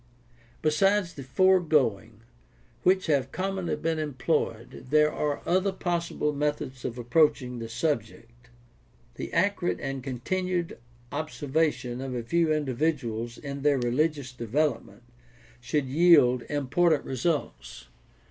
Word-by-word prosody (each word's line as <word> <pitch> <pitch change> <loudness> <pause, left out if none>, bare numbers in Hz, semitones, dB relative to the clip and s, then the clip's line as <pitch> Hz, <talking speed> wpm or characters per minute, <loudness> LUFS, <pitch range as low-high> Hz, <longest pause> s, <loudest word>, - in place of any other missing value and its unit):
— 120 0 -30
Besides 185 +4 +2
the 140 - -8
foregoing, 135 - +2 0.6
which 185 +1 +3
have 140 -4 +1
commonly 190 -1 -2
been 160 +1 -2
employed, 135 -5 -2
there 150 +1 +4
are 145 -1 -2
other 185 +3 +2
possible 170 -5 -2
methods 145 -3 -2
of 120 - -4
approaching 125 0 +2
the 115 -1 -6
subject. 120 -2 -4 0.6
The - - -6
accurate 190 0 +1
and 135 -2 -4
continued 175 +7 -2 0.3
observation 145 -4 -1
of 135 -1 -4
a 120 - -3
few 165 +6 +1
individuals 130 -5 -1
in 140 -1 -6
their 145 -1 +3
religious 135 +2 0
development 120 -2 -2 0.6
should 135 +4 -1
yield 135 -4 +5
important 145 +3 +1
results. 120 - -3
145 Hz, 115 wpm, -27 LUFS, 125-165 Hz, 0.6 s, yield